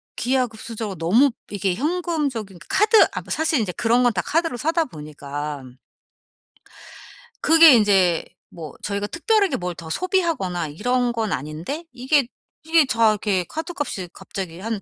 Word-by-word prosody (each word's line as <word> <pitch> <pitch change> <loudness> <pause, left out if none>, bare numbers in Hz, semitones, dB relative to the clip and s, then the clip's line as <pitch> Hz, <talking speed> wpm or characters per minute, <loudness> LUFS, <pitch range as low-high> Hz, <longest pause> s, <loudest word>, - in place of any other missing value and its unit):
기하급수적으로 230 -5 -2
너무 215 - +4 0.2
이게 195 -2 -1
현금적인 290 - -2
카드 425 +3 +4
아 - - -3
뭐 - - -17
사실 315 -4 +1
이제 190 -4 -2
그런 235 +2 +2
건 240 -2 +3
다 180 - 0
카드로 330 -5 0
사다 325 +4 0
보니까 150 - -7 1.8
그게 325 -2 +8
인제 195 -6 +3 0.2
뭐 160 -5 -9
저희가 200 0 -2
특별하게 400 - +1
뭘 180 -1 -4
더 160 -1 -10
소비하거나 310 - -1
이런 245 +10 0
건 220 -4 -2
아닌데 160 - -5
이게, 260 +1 +1 0.4
이게 320 -2 +4
다 230 -4 +3
이렇게 200 -3 0
카드값이 295 - -5
갑자기 180 -3 -7
한 220 0 -3
225 Hz, 310 characters per minute, -22 LUFS, -, 1.8 s, 그게